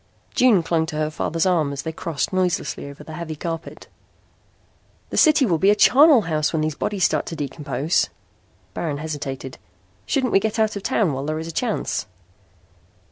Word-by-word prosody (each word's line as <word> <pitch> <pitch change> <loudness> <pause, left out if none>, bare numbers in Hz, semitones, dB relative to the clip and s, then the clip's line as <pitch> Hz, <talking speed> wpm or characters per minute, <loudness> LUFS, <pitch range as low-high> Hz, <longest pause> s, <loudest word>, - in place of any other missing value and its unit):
June 230 -9 +4
clung 165 -1 0
to 160 - -6
her 155 0 -1
father's 165 +2 -1
arm 165 -6 +2
as 140 -1 -5
they 160 - -3
crossed 160 +1 -3
noiselessly 180 -5 -1
over 140 +1 -11
the 160 - -10
heavy 160 -1 -5
carpet. 165 +1 -6 1.3
"The - - -3
city 305 -3 +5
will 170 -7 +1
be 195 - +4
a 205 - +5
charnel 275 +4 +6
house 155 -5 0
when 160 -2 0
these 155 0 -1
bodies 200 +5 -2
start - - +1
to 165 - -5
decompose." 145 +1 -1 0.6
Baron 155 -4 -3
hesitated. 145 -4 -6 0.5
"Shouldn't 260 -4 0
we - - +6
get 220 +2 -2
out 220 -1 +1
of 200 - -4
town 200 - +1
while 135 +1 -4
there 155 0 -1
is 160 +1 -5
a - - -5
chance?" 225 +6 -2
165 Hz, 185 wpm, -22 LUFS, 155-200 Hz, 1.3 s, charnel